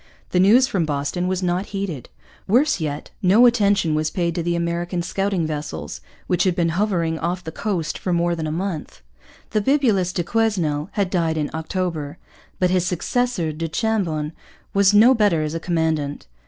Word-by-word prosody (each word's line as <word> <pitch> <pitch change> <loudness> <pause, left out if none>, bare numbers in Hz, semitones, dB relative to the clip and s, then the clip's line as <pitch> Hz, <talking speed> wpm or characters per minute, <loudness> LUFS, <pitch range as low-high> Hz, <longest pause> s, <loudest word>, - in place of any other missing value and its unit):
The 180 - +2
news 220 +8 +6
from 195 -9 0
Boston 150 +4 -2
was 185 0 -1
not 180 +2 0
heeded. 195 -9 -5 0.4
Worse 255 +5 +3
yet, 150 -2 -4
no 200 +6 +6
attention 200 -8 +3
was 155 0 0
paid 170 -2 -1
to 170 - -2
the 170 +1 -1
American 170 +1 -2
scouting 195 -1 -1
vessels, 150 - -5 0.2
which 180 - +1
had 185 -2 +1
been 170 -2 +1
hovering 170 -3 0
off 180 +2 -2
the 160 - -6
coast 175 -4 -3
for 185 - -2
more 175 0 +1
than 160 -1 -3
a - - -2
month. 155 - -4 0.5
The 215 - +1
bibulous 220 -8 +2
du 175 - -2
Quesnel 175 -6 0
had 195 -3 -1
died 165 -3 0
in 150 -2 -2
October. 160 -2 -3 0.4
But 180 -1 +1
his 185 -2 +2
successor, 180 0 -1
du 165 +2 -4
Chambon, 165 -6 -1 0.4
was 200 0 +5
no 220 +5 +7
better 205 -9 +2
as 155 0 -3
a 165 - -2
commandant. 160 -4 -1
175 Hz, 180 wpm, -22 LUFS, 160-200 Hz, 0.5 s, no